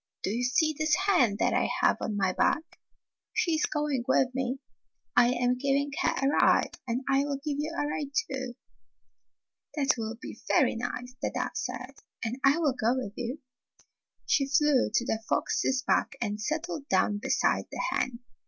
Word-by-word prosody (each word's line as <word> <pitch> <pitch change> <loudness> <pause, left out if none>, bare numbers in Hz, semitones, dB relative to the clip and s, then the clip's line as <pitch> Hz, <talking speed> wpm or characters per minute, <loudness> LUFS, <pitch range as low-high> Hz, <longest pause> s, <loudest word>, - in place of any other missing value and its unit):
" - - -57
Do - - 0
you 235 +3 -1
see 310 +5 +2
this 310 +1 +2
hen 360 - +3
that - - +1
I - - +1
have - - +4
on 215 -2 -2
my 190 -2 +1
back? 320 - 0 0.5
She 340 - +1
is 310 - +2
going 295 -4 -1
with 260 -1 +3
me. 260 0 -1 0.6
I 245 -1 +6
am 245 0 +1
giving 280 +1 +1
her - - +3
a 270 - +2
ride, 285 - +3
and 240 +2 -1
I 275 +1 +3
will 285 -1 -2
give 285 0 -3
you 305 +2 -2
a - - 0
ride, 295 -1 -3
too." 265 - -2 1.2
"That 280 -2 +3
will 225 0 -3
be - - -9
very - - +3
nice," 245 +1 -4
the - - 0
dove - - -3
said, 250 +1 -4 0.3
"and 235 +4 -3
I 275 +3 +5
will 305 -5 +2
go 240 0 +1
with 250 -6 -4
you." 250 +5 -4 0.8
She 275 -2 +2
flew 295 -2 +3
to 240 - +1
the 220 - -1
fox's 260 -1 +1
back - - +1
and 210 -2 -2
settled 305 +2 -3
down 205 -1 +2
beside - - +1
the - - -4
hen. 245 -1 -1
265 Hz, 185 wpm, -28 LUFS, 245-295 Hz, 1.2 s, I